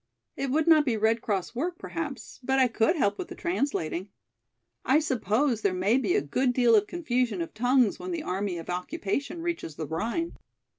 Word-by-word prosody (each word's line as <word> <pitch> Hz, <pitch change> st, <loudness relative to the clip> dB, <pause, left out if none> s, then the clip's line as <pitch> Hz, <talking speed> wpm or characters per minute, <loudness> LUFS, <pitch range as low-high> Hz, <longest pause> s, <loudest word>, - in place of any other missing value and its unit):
It 275 Hz, 0 st, -2 dB
would 305 Hz, +4 st, +2 dB
not 315 Hz, -2 st, +6 dB
be 245 Hz, -6 st, 0 dB
Red 220 Hz, +2 st, +2 dB
Cross 195 Hz, -4 st, -2 dB
work 340 Hz, +8 st, -2 dB
perhaps, 315 Hz, -6 st, -6 dB
but 265 Hz, +1 st, +1 dB
I 260 Hz, -1 st, +5 dB
could 230 Hz, +6 st, +2 dB
help 205 Hz, -10 st, +1 dB
with 360 Hz, -, -4 dB
the -, -, -9 dB
translating, 265 Hz, -, -2 dB, 0.7 s
I 270 Hz, -, +4 dB
suppose 255 Hz, -4 st, +1 dB
there 195 Hz, -3 st, +1 dB
may 200 Hz, +8 st, +2 dB
be 210 Hz, -9 st, +1 dB
a -, -, +3 dB
good 250 Hz, -, +1 dB
deal 240 Hz, -2 st, +5 dB
of 210 Hz, -1 st, +3 dB
confusion 250 Hz, -, -1 dB
of 165 Hz, -, -4 dB
tongues 245 Hz, -1 st, +2 dB
when 370 Hz, -, -6 dB
the 335 Hz, -3 st, -3 dB
army 190 Hz, -, -2 dB
of 165 Hz, -, -8 dB
occupation 200 Hz, -, -3 dB
reaches 335 Hz, -, -3 dB
the 155 Hz, -, -4 dB
Rhine." 230 Hz, -, -2 dB
245 Hz, 195 wpm, -27 LUFS, 200-295 Hz, 0.7 s, not